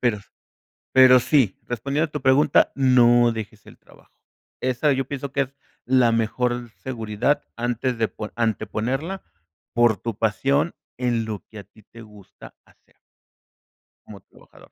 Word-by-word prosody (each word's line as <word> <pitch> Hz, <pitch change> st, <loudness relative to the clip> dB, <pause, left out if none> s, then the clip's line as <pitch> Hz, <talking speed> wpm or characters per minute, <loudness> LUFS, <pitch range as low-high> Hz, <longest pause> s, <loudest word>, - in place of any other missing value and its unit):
Pero, 115 Hz, -4 st, +1 dB, 0.7 s
pero 130 Hz, -1 st, +7 dB
sí, 125 Hz, -8 st, +2 dB
respondiendo 140 Hz, +7 st, -2 dB
a -, -, -28 dB
tu 150 Hz, -, -5 dB
pregunta, 135 Hz, +3 st, +3 dB
no 120 Hz, -3 st, +4 dB
dejes 110 Hz, -1 st, -7 dB
el -, -, -15 dB
trabajo. -, -, -22 dB, 0.5 s
Esa 130 Hz, +4 st, 0 dB
yo 135 Hz, 0 st, -1 dB
pienso 140 Hz, -1 st, -5 dB
que 140 Hz, -, +1 dB
es 135 Hz, +1 st, -8 dB, 0.3 s
la 125 Hz, -2 st, +3 dB
mejor 120 Hz, +1 st, -1 dB
seguridad 115 Hz, +2 st, -1 dB
antes 120 Hz, +1 st, -2 dB
de 110 Hz, -, +1 dB
po 105 Hz, -, -8 dB
anteponerla 125 Hz, -, -2 dB, 0.5 s
por 120 Hz, -4 st, +3 dB
tu 115 Hz, -1 st, -5 dB
pasión 140 Hz, +8 st, 0 dB, 0.2 s
en 120 Hz, -3 st, -1 dB
lo 105 Hz, -5 st, -6 dB
que 110 Hz, -, -12 dB
a -, -, -13 dB
ti 110 Hz, -2 st, -23 dB
te 115 Hz, 0 st, -14 dB
gusta 105 Hz, -3 st, -15 dB
hacer. -, -, -29 dB, 1.1 s
Como 100 Hz, -2 st, -12 dB
trabajador. -, -, -21 dB
120 Hz, 145 wpm, -23 LUFS, 110-130 Hz, 1.1 s, pero